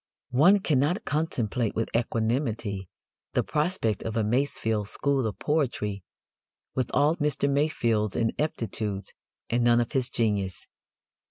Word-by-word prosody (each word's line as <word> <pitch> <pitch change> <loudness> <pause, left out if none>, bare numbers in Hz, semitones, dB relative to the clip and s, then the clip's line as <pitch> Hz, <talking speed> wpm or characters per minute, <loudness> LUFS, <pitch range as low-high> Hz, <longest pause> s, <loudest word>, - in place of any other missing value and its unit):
One 175 +11 +5
cannot 155 - +1
contemplate 125 -8 -1
with 115 - -1
equanimity 115 - -1 0.4
the - - +2
prospect 150 - 0
of 110 0 -3
a 110 - +2
Masefield 110 -3 0
school 135 0 0
of 105 - -5
poetry 120 - -1 0.7
with 130 -2 -1
all 150 +4 +3
Mr. 150 -2 +1
Masefield's 120 -8 +1
ineptitudes 110 -5 -2 0.4
and 120 +1 +2
none 120 0 +5
of 120 - -1
his 130 -2 +1
genius. 100 -6 -1
120 Hz, 120 wpm, -27 LUFS, 110-145 Hz, 0.7 s, One